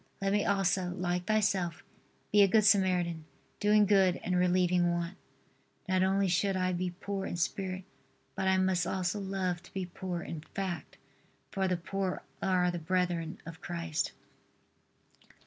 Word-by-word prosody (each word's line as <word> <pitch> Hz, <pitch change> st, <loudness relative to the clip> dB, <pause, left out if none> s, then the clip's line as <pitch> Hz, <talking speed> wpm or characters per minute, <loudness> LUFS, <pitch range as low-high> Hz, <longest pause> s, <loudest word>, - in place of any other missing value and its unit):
Let 195 Hz, 0 st, 0 dB
me 205 Hz, -, +2 dB
also, 190 Hz, -2 st, +1 dB
like 180 Hz, -1 st, -1 dB
Thyself, 195 Hz, -6 st, +1 dB, 0.5 s
be 205 Hz, -, +6 dB
a 200 Hz, -, +7 dB
good 215 Hz, +2 st, +4 dB
Samaritan, 180 Hz, -5 st, +3 dB, 0.3 s
doing 210 Hz, 0 st, +5 dB
good 190 Hz, -3 st, +4 dB
and 180 Hz, -, 0 dB
relieving 180 Hz, -1 st, +3 dB
want. 170 Hz, +1 st, -2 dB, 0.7 s
Not 185 Hz, 0 st, +2 dB
only 195 Hz, +1 st, +2 dB
should 190 Hz, +2 st, +1 dB
I 185 Hz, 0 st, +1 dB
be 180 Hz, +1 st, -1 dB
poor 200 Hz, -2 st, -3 dB
in -, -, -4 dB
spirit, 185 Hz, +1 st, -2 dB, 0.5 s
but 190 Hz, -, -2 dB
I 190 Hz, 0 st, +4 dB
must 185 Hz, -2 st, +2 dB
also 185 Hz, +2 st, -1 dB
love 190 Hz, -3 st, -2 dB
to 180 Hz, -, -18 dB
be 190 Hz, -1 st, -2 dB
poor 175 Hz, -1 st, -5 dB
in 160 Hz, -, -6 dB
fact, 190 Hz, -3 st, -4 dB, 0.5 s
for 190 Hz, -1 st, 0 dB
the 180 Hz, -1 st, +1 dB
poor 190 Hz, +2 st, -3 dB, 0.2 s
are 180 Hz, -2 st, +2 dB
the 175 Hz, -, -4 dB
brethren 175 Hz, -1 st, -1 dB
of 165 Hz, 0 st, -9 dB
Christ. 170 Hz, -2 st, -2 dB
185 Hz, 155 wpm, -31 LUFS, 175-195 Hz, 0.7 s, a